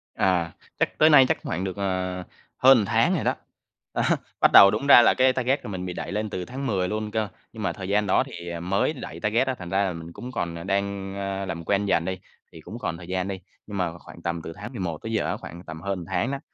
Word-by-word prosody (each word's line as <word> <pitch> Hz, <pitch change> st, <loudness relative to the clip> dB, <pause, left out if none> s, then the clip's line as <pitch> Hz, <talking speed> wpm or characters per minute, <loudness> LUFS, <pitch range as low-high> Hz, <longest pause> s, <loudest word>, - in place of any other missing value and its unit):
À, 90 Hz, -3 st, +1 dB, 0.3 s
chắc -, -, 0 dB
tới 155 Hz, -, +7 dB
nay 135 Hz, -4 st, +8 dB
chắc -, -, -1 dB
hoảng 90 Hz, -, -3 dB
được, 95 Hz, 0 st, -4 dB
ờ, 95 Hz, -2 st, -1 dB, 0.4 s
hơn 130 Hz, 0 st, +7 dB
một 105 Hz, -, +1 dB
tháng -, -, +2 dB
rồi -, -, -1 dB
đó. -, -, +1 dB, 0.6 s
Đó, -, -, 0 dB, 0.4 s
bắt -, -, +6 dB
đầu 100 Hz, 0 st, +10 dB
đúng 115 Hz, +7 st, -2 dB
ra 130 Hz, -, +10 dB
là -, -, +5 dB
cái 130 Hz, 0 st, +4 dB
target 130 Hz, +2 st, 0 dB
của -, -, -6 dB
mình 90 Hz, -2 st, -4 dB
bị 90 Hz, -, -4 dB
đẩy -, -, -5 dB
lên 105 Hz, +1 st, -2 dB
từ 90 Hz, -2 st, -4 dB
tháng 135 Hz, +2 st, -5 dB
10 95 Hz, -5 st, 0 dB
luôn 105 Hz, +1 st, -3 dB
cơ, 110 Hz, -1 st, 0 dB, 0.3 s
nhưng 110 Hz, -, -7 dB
mà 95 Hz, -, 0 dB
thời 95 Hz, -1 st, -7 dB
gian 105 Hz, +1 st, +2 dB
đó 95 Hz, -, +3 dB
thì, 85 Hz, 0 st, -8 dB
ờ, 85 Hz, -1 st, -4 dB
mới 100 Hz, -, 0 dB
đẩy 130 Hz, -, -8 dB
target 115 Hz, +5 st, +1 dB
á 130 Hz, -, 0 dB
thành 90 Hz, -, -7 dB
ra 95 Hz, +2 st, +2 dB
là 95 Hz, -3 st, -1 dB
mình 85 Hz, 0 st, -9 dB
cũng 125 Hz, +7 st, -8 dB
còn, 85 Hz, -8 st, -3 dB
ờ, 85 Hz, -, -7 dB
đang, 100 Hz, 0 st, -2 dB
ơ, 100 Hz, 0 st, -3 dB
làm 85 Hz, -3 st, -5 dB
quen 100 Hz, 0 st, +1 dB
dần 85 Hz, -4 st, +1 dB
đi, 95 Hz, -1 st, -3 dB, 0.3 s
thì -, -, -12 dB
cũng -, -, -9 dB
còn 85 Hz, -, -3 dB
thời 85 Hz, 0 st, -11 dB
gian 95 Hz, 0 st, -2 dB
đi. 95 Hz, -1 st, -4 dB, 0.3 s
Nhưng 105 Hz, -2 st, -5 dB
mà 85 Hz, -2 st, -2 dB
khoảng 85 Hz, -, -13 dB
tầm 85 Hz, 0 st, -3 dB
từ 80 Hz, -, -7 dB
tháng 110 Hz, +5 st, -8 dB
11 90 Hz, -8 st, -3 dB
tới 110 Hz, -, -4 dB
giờ 110 Hz, -, 0 dB
á, -, -, -2 dB
khoảng 85 Hz, +2 st, -10 dB
tầm 80 Hz, 0 st, -8 dB
hơn 100 Hz, 0 st, -2 dB
một 85 Hz, -, -8 dB
tháng 130 Hz, -, -1 dB
á, 140 Hz, -, -3 dB
100 Hz, 280 wpm, -25 LUFS, 90-110 Hz, 0.6 s, đầu